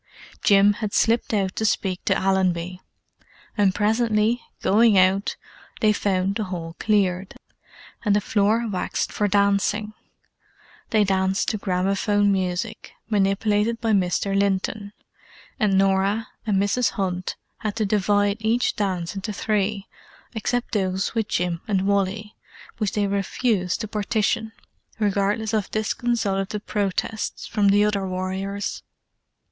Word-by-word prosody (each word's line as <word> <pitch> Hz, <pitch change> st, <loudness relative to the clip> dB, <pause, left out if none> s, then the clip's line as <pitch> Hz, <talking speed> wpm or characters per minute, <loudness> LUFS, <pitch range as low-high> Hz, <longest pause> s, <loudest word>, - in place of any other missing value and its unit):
Jim 200 Hz, 0 st, +5 dB
had 210 Hz, -1 st, -4 dB
slipped 230 Hz, +1 st, +2 dB
out 195 Hz, -3 st, 0 dB
to -, -, -2 dB
speak 190 Hz, -3 st, 0 dB
to -, -, +3 dB
Allenby: 185 Hz, -2 st, 0 dB, 0.7 s
and 200 Hz, -3 st, +2 dB
presently, 220 Hz, +1 st, +2 dB, 0.2 s
going 220 Hz, 0 st, +5 dB
out, 190 Hz, +2 st, +3 dB, 0.4 s
they 215 Hz, -2 st, +4 dB
found 195 Hz, -1 st, 0 dB
the 215 Hz, +1 st, -2 dB
hall 170 Hz, -3 st, -6 dB
cleared, 195 Hz, -3 st, +1 dB, 0.7 s
and 205 Hz, -2 st, +3 dB
the -, -, +4 dB
floor 215 Hz, +3 st, +1 dB
waxed 190 Hz, -4 st, -2 dB
for 210 Hz, -, +1 dB
dancing. 205 Hz, +1 st, +1 dB, 1.0 s
They 215 Hz, -1 st, +3 dB
danced 190 Hz, 0 st, +1 dB
to 215 Hz, -, -2 dB
gramophone 195 Hz, +2 st, +1 dB
music, 190 Hz, +3 st, -2 dB, 0.2 s
manipulated 210 Hz, +3 st, +1 dB
by 230 Hz, -1 st, 0 dB
Mr. 195 Hz, 0 st, +1 dB
Linton: 200 Hz, +1 st, 0 dB, 0.7 s
and 200 Hz, -3 st, +3 dB
Norah 195 Hz, +3 st, +2 dB, 0.2 s
and 205 Hz, -2 st, +2 dB
Mrs. 205 Hz, +5 st, +2 dB
Hunt 185 Hz, -3 st, -2 dB, 0.2 s
had 215 Hz, -2 st, -3 dB
to 220 Hz, -2 st, 0 dB
divide 205 Hz, 0 st, +2 dB
each 225 Hz, +3 st, +1 dB
dance 185 Hz, -5 st, -2 dB
into 200 Hz, +2 st, -4 dB
three, 210 Hz, -1 st, -1 dB, 0.5 s
except 245 Hz, +2 st, -2 dB
those 190 Hz, -2 st, -1 dB
with 225 Hz, -2 st, -1 dB
Jim 175 Hz, -4 st, -1 dB
and 195 Hz, -3 st, +1 dB
Wally, 200 Hz, +1 st, -1 dB, 0.4 s
which 210 Hz, -3 st, -1 dB
they 205 Hz, -1 st, +1 dB
refused 200 Hz, -1 st, 0 dB
to 215 Hz, -, -3 dB
partition, 220 Hz, +1 st, -1 dB, 0.5 s
regardless 210 Hz, +1 st, 0 dB
of 215 Hz, -3 st, 0 dB
disconsolate 215 Hz, -3 st, -1 dB
protests 205 Hz, +1 st, -2 dB
from 205 Hz, -2 st, +1 dB
the 205 Hz, +1 st, +4 dB
other 200 Hz, -2 st, 0 dB
warriors. 190 Hz, +2 st, -3 dB
200 Hz, 130 wpm, -23 LUFS, 190-215 Hz, 1.0 s, Jim